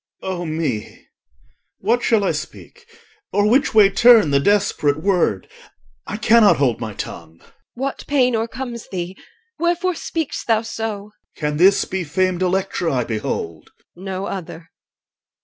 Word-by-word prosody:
O 180 -2 -3
me! 155 -9 -4 0.7
What 235 +5 +1
shall 225 -4 +2
I - - +1
speak, 470 -1 -8 0.4
or 205 0 +2
which 260 +2 +2
way 205 -2 +7
turn 230 -8 +6
The 140 - +4
desperate 155 -5 +1
word? 175 - 0 0.6
I 210 - -4
cannot 220 -1 +5
hold 130 -5 +1
my 110 -3 -6
tongue. 85 -1 -8
EL. - - -23 0.3
What 270 +3 -4
pain 255 -4 +2
o'ercomes 235 +1 -5
thee? 180 0 -5 0.4
Wherefore 350 +2 +1
speak'st 325 -3 -4
thou 225 -1 +2
so? 225 -2 -4
OR. 210 +1 -16 0.2
Can 150 -2 -2
this 190 +4 +4
be 190 -1 -3
famed 185 +3 -1
Electra 185 -2 0
I 125 -3 0
behold? 95 -8 -4 0.3
EL. 175 - -15
No 190 0 -4
other. 165 -4 -7
195 Hz, 150 wpm, -20 LUFS, 160-225 Hz, 0.7 s, way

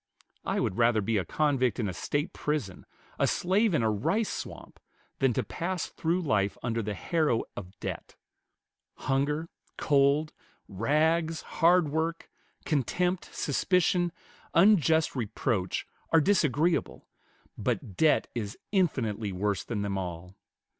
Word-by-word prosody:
I - - 0
would 95 - -1
rather 115 -1 +4
be 110 +2 0
a 95 - -1
convict 130 - +1
in 110 - 0
a 95 - -3
State 145 - -2
prison, 145 -12 -3 0.3
a - - +3
slave 195 +2 +2
in 120 - +2
a 110 - +2
rice 195 - 0
swamp, - - -7 0.4
than 135 -2 +3
to - - 0
pass 175 0 -3
through 170 +3 -1
life 100 -9 +1
under 115 -1 -1
the 105 -1 -3
harrow 155 - +1
of 95 0 -9
debt. - - -6 0.8
Hunger, 145 +4 -1 0.3
cold, 145 +1 +2 0.3
rags, 160 - +1
hard 170 -1 +3
work, 160 +2 -2 0.3
contempt, 175 - 0
suspicion, 175 +5 +1 0.4
unjust 165 -5 +4
reproach, 110 -4 -1 0.3
are 165 - +6
disagreeable, 165 -2 +1 0.5
but 95 - -3
debt 155 - +3
is 105 -4 -4
infinitely 115 - 0
worse 100 +1 -1
than 105 -4 -3
them 100 -1 -2
all. 90 0 -6
140 Hz, 130 wpm, -28 LUFS, 105-165 Hz, 0.8 s, are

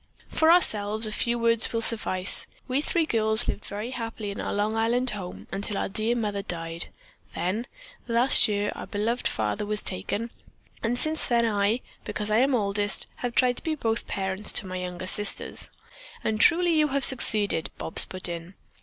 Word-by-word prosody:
"For 320 +1 +4
ourselves 215 -10 +4
a 215 - -2
few 235 +2 -1
words 230 -1 +2
will 230 - -1
suffice. 185 -5 +3 0.2
We 260 +2 0
three 330 +1 0
girls 220 -3 +1
lived - - -3
very 210 +4 -5
happily 225 -4 -5
in 200 - -5
our - - -3
Long 210 +2 0
Island 240 +3 +1
home 185 -4 -7
until 200 +1 -2
our - - -2
dear 220 +4 0
mother 210 -4 -2
died; 165 -3 -5 0.5
then, 210 +8 -2 0.4
last 240 +3 +5
year, 205 -1 -1
our - - -8
beloved 225 +4 -1
father 105 - -2
was 210 0 -1
taken, 220 - -3 0.5
and 235 +2 -1
since 310 +3 -1
then 235 -1 +2
I, 210 +2 +1 0.2
because 210 0 -2
I 215 - +4
am 265 +1 +3
oldest, 205 -2 +2
have 245 -1 -4
tried 250 -1 +3
to - - -4
be 320 -1 -1
both 225 -5 -2
parents 190 +1 -2
to - - +2
my 185 0 -5
younger 180 0 -5
sisters." 205 +2 +1 0.5
"And 215 -1 -1
truly 345 0 +4
you 305 -1 +3
have 275 -1 +1
succeeded," 210 -9 +2
Bobs - - 0
put 185 0 -3
in. 170 +2 -7
215 Hz, 180 wpm, -26 LUFS, 200-240 Hz, 0.5 s, last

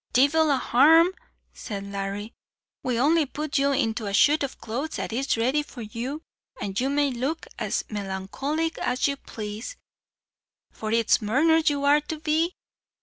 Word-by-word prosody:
"Divil 300 +5 +4
a 280 - +3
harm," 315 +8 +5 0.4
said 200 -2 -6
Larry. 200 +2 -5 0.5
"We'll 250 -1 0
only 315 -1 +3
put 295 +1 -2
you 280 0 +2
into 225 -5 0
a 200 - -1
shoot 295 +5 +4
o' - - +1
clothes 270 +5 -5
that - - -4
is 265 0 0
ready 260 +6 +2
for 260 -5 -9
you, 245 +8 -5 0.4
and 195 0 -3
you 260 +2 0
may 285 0 +1
look 265 +7 -3
as - - -1
melancholy 215 +11 -3
as 250 +2 +1
you 280 - -1
plaze, 220 - -7 1.0
for 215 -1 -5
it 230 -1 +1
is - - +7
murners 310 +9 +3
you 285 -1 -2
are 290 +1 +5
to 310 +1 -5
be. 320 +3 0
270 Hz, 165 wpm, -25 LUFS, 225-300 Hz, 1.0 s, is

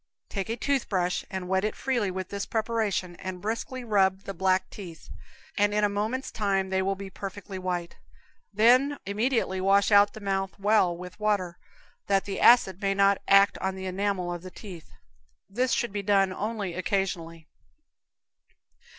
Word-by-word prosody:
Take 195 0 -4
a 230 - -2
toothbrush, 205 -10 0
and 190 -1 -5
wet 190 +1 +1
it 215 - -1
freely 240 -7 -1
with 185 0 -5
this 200 -1 -4
preparation, 215 -5 -1
and 185 -1 -6
briskly 230 +5 -4
rub 195 -4 +2
the 195 - -6
black 190 +1 +1
teeth, 175 -6 -10 0.5
and 205 0 +2
in 210 - +2
a 205 - +4
moment's 220 +6 -2
time 195 -3 -1
they 190 0 +1
will 195 +1 0
be 195 0 -8
perfectly 195 0 -7
white; 180 -2 -4 0.5
then 250 +7 +4
immediately 210 -2 0
wash 195 +2 +3
out 205 0 +6
the - - -9
mouth 195 -1 -2
well 200 -4 +2
with 180 +2 -10
water, 200 -5 -1 0.5
that 195 -1 +2
the 195 -1 -4
acid 195 -6 +5
may 195 -1 +1
not 200 0 +3
act 195 0 +5
on 190 0 -2
the 190 0 -6
enamel 185 -1 -1
of 175 - -6
the 185 - -9
teeth. 180 -4 -11 0.6
This 250 +6 -1
should 240 -3 0
be 205 0 -3
done 195 -1 +2
only 205 -2 -3
occasionally. 170 -3 -2
195 Hz, 170 wpm, -27 LUFS, 185-210 Hz, 0.6 s, out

